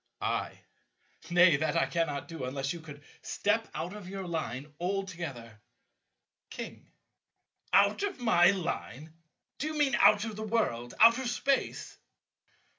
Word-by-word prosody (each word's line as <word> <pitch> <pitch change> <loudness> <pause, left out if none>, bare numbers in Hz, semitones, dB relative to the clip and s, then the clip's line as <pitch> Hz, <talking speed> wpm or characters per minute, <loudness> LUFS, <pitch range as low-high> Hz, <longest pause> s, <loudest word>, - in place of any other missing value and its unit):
I. - - -2 0.7
Nay, 175 -3 +6
that 155 0 0
I - - +3
cannot 145 -1 -2
do, 165 -5 -6
unless 135 +3 -3
you 170 - -7
could 150 -2 -12 0.2
step 220 +2 0
out 165 +4 -4
of 205 -3 -9
your 195 -1 -5
Line 150 -4 -4
altogether. 170 - -4 0.9
King. - - -9 0.8
Out - - +4
of 400 -7 -2
my 175 -8 +5
Line? 160 - -3 0.5
Do 300 - -2
you 310 0 -4
mean 285 -4 +2
out 210 -2 +5
of 220 -2 -5
the - - -5
world? 205 - -1
Out 230 +3 +7
of 260 -2 -2
Space? 270 +2 -1
175 Hz, 140 wpm, -30 LUFS, 145-215 Hz, 0.9 s, Out